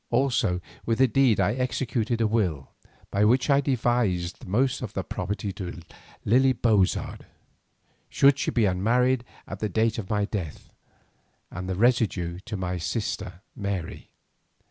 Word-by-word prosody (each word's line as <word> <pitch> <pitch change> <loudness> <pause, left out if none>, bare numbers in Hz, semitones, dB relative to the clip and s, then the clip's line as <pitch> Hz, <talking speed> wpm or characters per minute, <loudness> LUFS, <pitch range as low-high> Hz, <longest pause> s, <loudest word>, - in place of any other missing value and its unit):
Also 120 -8 +1 0.2
with 115 -1 0
the 130 - +5
deed 125 -1 +3
I 105 - +2
executed 120 -2 -1
a - - +3
will 90 -11 -1 0.4
by 100 - +2
which 125 +6 +3
I 140 0 +5
devised 120 -9 0
the - - -12
most 125 +7 +1
of - - -6
my - - -1
property 100 +2 -4
to 90 -3 -6 0.5
Lily 130 +4 +4
Bozard 110 -6 0 0.8
should 140 0 +4
she - - 0
be 115 -3 +2
unmarried 120 +7 +2 0.2
at 95 - -7
the 110 - -2
date 110 +2 +1
of 100 -3 -6
my 105 -2 +1
death, 95 -8 -6 0.8
and 90 +1 -6
the 95 - -1
residue 100 -6 +1
to 110 -3 -4
my 90 -1 -3
sister 95 +1 -4
Mary. 100 -5 -5
110 Hz, 150 wpm, -26 LUFS, 95-125 Hz, 0.8 s, the